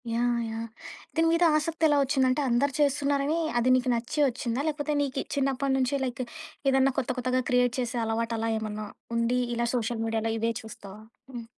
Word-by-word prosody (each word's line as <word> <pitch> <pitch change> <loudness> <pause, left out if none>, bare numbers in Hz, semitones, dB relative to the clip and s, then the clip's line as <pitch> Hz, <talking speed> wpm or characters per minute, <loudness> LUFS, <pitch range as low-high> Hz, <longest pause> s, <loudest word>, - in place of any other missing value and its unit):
Yeah! 240 +1 +1
Yeah! 225 +1 -5 0.5
దీని 325 0 +3
మీద 335 +1 +3
ఆసక్తి 325 +1 -1
ఎలా 295 -1 +3
వచ్చింది 265 -1 +2
అంటే, 255 +3 +1
అందరూ 255 +4 +2
చేస్తున్నారని 285 +1 +1 0.2
అది 240 +1 +2
నీకు 255 0 +1
నచ్చి 235 +6 -3
వచ్చిందా? 245 0 -2
లేకపోతే 300 0 -1
నీకు 275 -1 -1
చిన్నప్పటి 275 0 0
నుంచి 260 0 0
లైక్ 255 0 -3 0.5
ఏదన్నా 270 0 +3
కొత్త 265 - -3
కొత్తగా 255 0 +1
క్రియేట్ 250 -1 +3
చేసే 245 0 -2
అలవాటలా 225 0 -1
ఏమన్నా 215 -1 -4 0.3
ఉండి, 235 +2 +1 0.2
ఇలా 235 0 0
సోషల్ 230 -1 -2
మీడియాలో 225 0 -1
ఇవే 230 +1 0
చూస్తావా? 210 -1 -11 0.3
హ్మ్. 240 -2 -7
250 Hz, 170 wpm, -27 LUFS, 230-275 Hz, 0.5 s, దీని